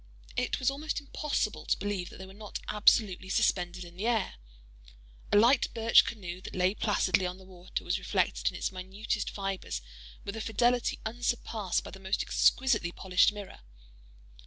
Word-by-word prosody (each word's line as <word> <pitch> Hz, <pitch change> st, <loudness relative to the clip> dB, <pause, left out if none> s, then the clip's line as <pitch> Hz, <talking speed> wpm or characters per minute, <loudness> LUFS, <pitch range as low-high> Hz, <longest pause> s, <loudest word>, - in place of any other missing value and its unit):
It 250 Hz, -, 0 dB
was 260 Hz, 0 st, +2 dB
almost 300 Hz, +3 st, -3 dB
impossible 285 Hz, -6 st, -2 dB
to -, -, +2 dB
believe 200 Hz, -3 st, -3 dB
that -, -, -12 dB
they 190 Hz, -, -8 dB
were 190 Hz, -, -12 dB
not 210 Hz, +1 st, -7 dB
absolutely 205 Hz, -3 st, +3 dB
suspended 180 Hz, -1 st, +1 dB
in 170 Hz, 0 st, -13 dB
the 210 Hz, +5 st, -1 dB
air. 225 Hz, -4 st, +1 dB, 1.0 s
A -, -, +6 dB
light 240 Hz, +5 st, +5 dB
birch 230 Hz, 0 st, +6 dB
canoe 185 Hz, -5 st, -6 dB
that -, -, -8 dB
lay 185 Hz, +1 st, +2 dB
placidly 205 Hz, -3 st, +1 dB
on 180 Hz, +1 st, -5 dB
the 190 Hz, -, -15 dB
water, 180 Hz, -1 st, -6 dB
was -, -, 0 dB
reflected -, -, 0 dB
in -, -, -9 dB
its -, -, -2 dB
minutest 195 Hz, +4 st, -3 dB
fibres 195 Hz, -1 st, -3 dB, 0.5 s
with 200 Hz, -, -4 dB
a 225 Hz, -, -4 dB
fidelity 240 Hz, +3 st, +1 dB
unsurpassed 225 Hz, -4 st, -1 dB
by -, -, -9 dB
the 195 Hz, -, -10 dB
most 190 Hz, +1 st, -1 dB
exquisitely 230 Hz, -10 st, +3 dB
polished 180 Hz, +2 st, +3 dB
mirror. 205 Hz, -2 st, -9 dB
205 Hz, 170 wpm, -30 LUFS, 185-230 Hz, 1.0 s, A